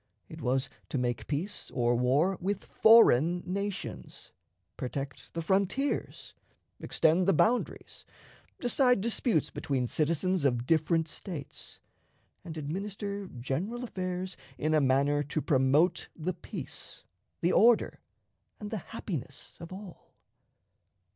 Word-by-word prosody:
It -, -, -9 dB
was 130 Hz, +1 st, +1 dB, 0.2 s
to -, -, -2 dB
make 120 Hz, -1 st, -2 dB
peace 155 Hz, +8 st, -3 dB
or 120 Hz, -1 st, +1 dB
war 135 Hz, +10 st, +2 dB
with 200 Hz, +2 st, -2 dB
foreign 175 Hz, -, +5 dB
nations, 195 Hz, -, -5 dB, 0.4 s
protect 135 Hz, +2 st, -5 dB
the 165 Hz, -, -2 dB
frontiers, 200 Hz, -, -1 dB, 0.5 s
extend 170 Hz, +3 st, +2 dB
the 195 Hz, -, +5 dB
boundaries, 240 Hz, +10 st, 0 dB, 0.6 s
decide 250 Hz, -1 st, +3 dB
disputes 215 Hz, -, +1 dB
between 135 Hz, -5 st, -1 dB
citizens 165 Hz, +6 st, 0 dB
of 120 Hz, -3 st, +1 dB
different 160 Hz, +2 st, +2 dB
States, 155 Hz, -4 st, -7 dB, 0.7 s
and 160 Hz, -1 st, -7 dB
administer 200 Hz, +5 st, -4 dB
general 175 Hz, -, -4 dB
affairs 185 Hz, -4 st, -4 dB, 0.2 s
in 155 Hz, +1 st, 0 dB
a 155 Hz, -, +4 dB
manner 140 Hz, +2 st, +3 dB
to 145 Hz, +2 st, -2 dB
promote 145 Hz, +3 st, +2 dB
the 175 Hz, +3 st, -2 dB
peace, 170 Hz, -, -8 dB, 0.4 s
the 175 Hz, -, +2 dB
order, 235 Hz, 0 st, +4 dB, 0.6 s
and 210 Hz, -1 st, -7 dB
the 220 Hz, -, -1 dB
happiness 160 Hz, -, -7 dB
of 170 Hz, -, -9 dB
all. 190 Hz, -1 st, -11 dB
170 Hz, 115 wpm, -30 LUFS, 140-195 Hz, 0.7 s, foreign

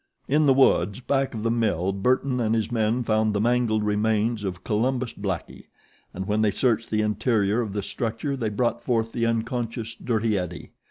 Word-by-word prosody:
In 150 Hz, +2 st, +3 dB
the 135 Hz, -, +6 dB
woods 100 Hz, -7 st, +3 dB
back 135 Hz, 0 st, -1 dB
of 110 Hz, -, -4 dB
the 115 Hz, -, +1 dB
mill 100 Hz, -6 st, +1 dB
Burton 125 Hz, +5 st, +1 dB
and 115 Hz, -1 st, +1 dB
his 110 Hz, +1 st, -1 dB
men 115 Hz, +1 st, +1 dB
found 110 Hz, -1 st, +1 dB
the -, -, +1 dB
mangled 115 Hz, -1 st, +2 dB
remains 105 Hz, +1 st, +1 dB
of 95 Hz, -2 st, -4 dB
Columbus 125 Hz, +3 st, 0 dB
Blackie, 95 Hz, -4 st, -5 dB, 0.5 s
and 95 Hz, +1 st, -5 dB
when 105 Hz, +1 st, +1 dB
they 110 Hz, -, +3 dB
searched 115 Hz, +1 st, 0 dB
the 110 Hz, 0 st, +1 dB
interior 105 Hz, 0 st, +1 dB
of 105 Hz, -4 st, -4 dB
the 100 Hz, -1 st, -2 dB
structure 115 Hz, +7 st, -3 dB
they 115 Hz, -5 st, -2 dB
brought 120 Hz, +2 st, -1 dB
forth 115 Hz, -2 st, 0 dB
the 115 Hz, 0 st, 0 dB
unconscious 115 Hz, 0 st, -2 dB
Dirty 110 Hz, -3 st, 0 dB
Eddie. 90 Hz, -1 st, -6 dB
110 Hz, 185 wpm, -25 LUFS, 105-120 Hz, 0.5 s, the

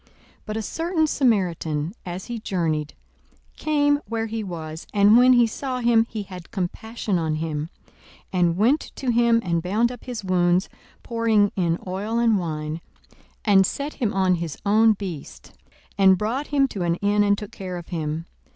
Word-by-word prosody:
42:010:033 -, -, -31 dB, 0.4 s
But 215 Hz, 0 st, -3 dB
a -, -, -1 dB
certain 325 Hz, -, 0 dB
Samaritan, 180 Hz, -, 0 dB
as 180 Hz, +1 st, -5 dB
he 240 Hz, -1 st, -5 dB
journeyed, 160 Hz, -7 st, -2 dB, 0.6 s
came 290 Hz, -1 st, +2 dB
where 225 Hz, +1 st, -2 dB
he 225 Hz, 0 st, -4 dB
was: 160 Hz, -4 st, -7 dB
and 205 Hz, +2 st, +6 dB
when 250 Hz, +1 st, +7 dB
he 240 Hz, -1 st, +5 dB
saw 255 Hz, +3 st, -4 dB
him, 235 Hz, -2 st, +3 dB
he 215 Hz, -2 st, -4 dB
had 180 Hz, -3 st, -10 dB
compassion 205 Hz, +1 st, -3 dB
on 160 Hz, -2 st, -1 dB
him, 155 Hz, 0 st, -3 dB, 0.6 s
42:010:034 185 Hz, -, 0 dB
And 170 Hz, -1 st, +2 dB
went 245 Hz, +10 st, +4 dB, 0.2 s
to 260 Hz, -, -3 dB
him, 235 Hz, 0 st, +4 dB
and 170 Hz, -1 st, 0 dB
bound 215 Hz, +7 st, +1 dB
up 245 Hz, -, -10 dB
his 245 Hz, -4 st, -5 dB
wounds, 180 Hz, 0 st, +2 dB, 0.3 s
pouring 225 Hz, -3 st, +2 dB
in 170 Hz, -3 st, +1 dB
oil 200 Hz, +5 st, -3 dB
and 230 Hz, -3 st, +3 dB
wine, 155 Hz, -1 st, -4 dB, 0.6 s
and 200 Hz, -3 st, +6 dB
set 280 Hz, +9 st, -3 dB
him 230 Hz, -7 st, -1 dB
on 190 Hz, -1 st, +2 dB
his 165 Hz, -4 st, -4 dB
own 220 Hz, +2 st, +5 dB
beast, 190 Hz, -7 st, -8 dB, 0.5 s
and 190 Hz, -1 st, +6 dB
brought 235 Hz, +9 st, -2 dB
him 275 Hz, -2 st, +2 dB
to 200 Hz, -, -5 dB
an 170 Hz, -1 st, +1 dB
inn, 205 Hz, +2 st, +2 dB
and 205 Hz, 0 st, +3 dB
took 210 Hz, -1 st, -7 dB
care 185 Hz, -2 st, -6 dB
of 175 Hz, -, -9 dB
him. 160 Hz, -1 st, -3 dB
200 Hz, 180 wpm, -23 LUFS, 175-230 Hz, 0.6 s, when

